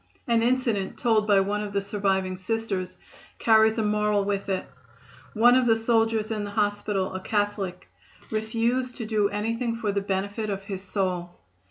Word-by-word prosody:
An 230 -1 +3
incident 235 -5 0
told 220 -4 +2
by 200 -2 +5
one 205 +2 -1
of 205 -1 -5
the 200 - +1
surviving 195 -2 0
Sisters 185 -2 -3 0.4
carries 220 0 +4
a 220 - +1
moral 210 -1 +1
with 200 0 -2
it. 190 -1 -1 0.7
One 240 +3 +6
of 255 -1 +4
the 225 -1 +4
soldiers 225 -1 +1
in 215 -1 -2
the 205 - -5
hospital, 205 -2 -1
a 185 - -3
Catholic, 205 -2 -2 0.4
refused 230 +3 -1
to 230 - -5
do 215 -2 +1
anything 230 +3 -2
for 220 -3 -1
the 200 0 -1
benefit 200 +2 -2
of 195 -1 -3
his 195 -2 -5
soul. 185 -3 -3
210 Hz, 170 wpm, -26 LUFS, 195-225 Hz, 0.7 s, One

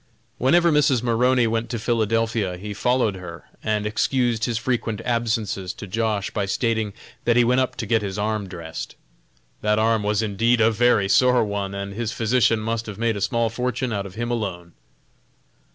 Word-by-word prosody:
Whenever 170 +6 +4
Mrs. 140 -5 +3
Maroney 125 +1 +3
went 115 +1 -1
to 120 - -2
Philadelphia 110 -3 0
he 105 +3 -6
followed 125 0 +1
her 85 -2 -9 0.2
and 105 -1 0
excused 115 +1 +1
his 120 -3 -1
frequent 115 -3 -1
absences 110 -6 -1
to - - -9
Josh. 105 0 -1
by 100 -3 -2
stating 110 0 0 0.3
that 120 - +2
he 120 - +5
went 125 +2 +3
up 130 - -2
to 115 - -4
get 110 +1 +2
his 100 -1 -4
arm 105 -1 -1
dressed. 85 -3 -7 0.7
That 105 0 +2
arm 110 0 +2
was 105 +1 0
indeed 115 +3 +2
a 115 0 +4
very 115 -3 +3
sore 125 +4 +4
one, 100 -1 -3
and 100 0 -5
his 115 +1 -3
physician 115 -1 +2
must 115 +1 -2
have 105 - -7
made 115 -1 0
a 100 - -4
small 115 +2 +1
fortune 125 +1 -2
out 100 -1 -3
of 95 - -13
him 120 +1 -3
alone. 90 -7 -4
110 Hz, 185 wpm, -23 LUFS, 105-120 Hz, 0.7 s, he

